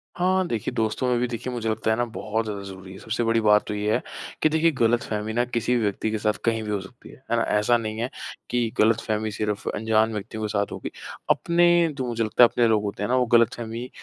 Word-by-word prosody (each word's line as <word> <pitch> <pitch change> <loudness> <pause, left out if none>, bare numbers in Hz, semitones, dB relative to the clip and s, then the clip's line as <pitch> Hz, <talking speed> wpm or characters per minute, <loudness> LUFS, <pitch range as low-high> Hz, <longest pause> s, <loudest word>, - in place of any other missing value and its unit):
हाँ 185 +1 +2
देखिए 115 -7 -2
दोस्तों 110 +3 -1
में 125 -1 +2
भी 125 - 0
देखिए 120 +2 -5
मुझे 115 -2 -2
लगता 110 0 0
है 110 - +3
ना 120 - +1
बहुत 110 +1 -2
ज़्यादा 100 -2 -4
ज़रूरी 95 -1 -10
है। - - -10
सबसे 115 +2 -2
बड़ी 115 0 +2
बात 105 -1 +4
तो - - -3
ये 105 +1 0
है - - 0 0.4
कि 155 - +5
देखिए 160 +1 +3
गलतफ़हमी 110 -3 0
ना 120 +1 +2
किसी 120 0 0
भी 120 - +1
व्यक्ति 105 +2 -1
के 110 - -1
साथ 105 0 +1
कहीं 115 -1 +1
भी 105 - -6
हो 100 - 0
सकती 110 +6 -14
है, - - -13 0.2
है - - +3
ना? 115 - +2
ऐसा 105 +3 +2
नहीं 110 -1 -4
है 120 +3 -1 0.4
कि 120 -2 0
गलतफ़हमी 110 -1 +1
सिर्फ़ 105 -1 -3
अनजान 110 +1 +1
व्यक्तियों 110 +1 -5
के - - 0
साथ 100 -1 -1
होगी। - - -6 0.4
अपने 175 -1 +3
तो 130 -2 -2
मुझे 115 -1 -1
लगता 110 +3 +4
है - - +9
अपने 120 -1 +2
लोग 110 -2 +2
होते 100 0 -4
हैं 105 - -2
ना 130 - +2
वो 125 - +3
गलतफ़हमी 115 +1 0
110 Hz, 250 wpm, -24 LUFS, 105-120 Hz, 0.4 s, है